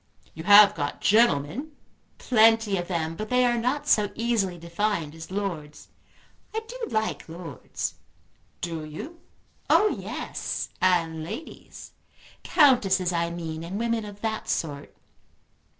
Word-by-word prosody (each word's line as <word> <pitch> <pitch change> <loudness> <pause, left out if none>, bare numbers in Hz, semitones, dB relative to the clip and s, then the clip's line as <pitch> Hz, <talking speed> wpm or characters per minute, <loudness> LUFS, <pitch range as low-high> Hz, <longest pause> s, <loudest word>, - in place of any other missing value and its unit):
"You 160 - -9
have 205 +1 +9
got 145 -3 -3
gentlemen?" 225 - +2 0.4
"Plenty 225 -3 +4
of 175 -1 -3
them; 165 -3 -2
but 215 +4 -6
they 250 0 +3
are 240 -1 +2
not 255 +5 -1
so 210 -2 +3
easily 225 -6 0
defined 170 -2 -2
as 160 0 -10
lords. 180 -7 -5 0.7
I 445 - 0
do 475 0 -6
like 220 -5 -2
lords." 165 -5 -6 0.7
"Do 165 -2 -4
you?" 225 - -8 0.5
"Oh 425 - +5
yes, - - -4
and 165 -4 +2
ladies; 300 - -9 0.5
Countesses 195 - +3
I 170 0 0
mean 165 -2 -5
and 180 +4 -5
women 230 0 -1
of 205 -1 -10
that 220 -1 -3
sort. 145 -3 -3
195 Hz, 130 wpm, -26 LUFS, 165-230 Hz, 0.7 s, have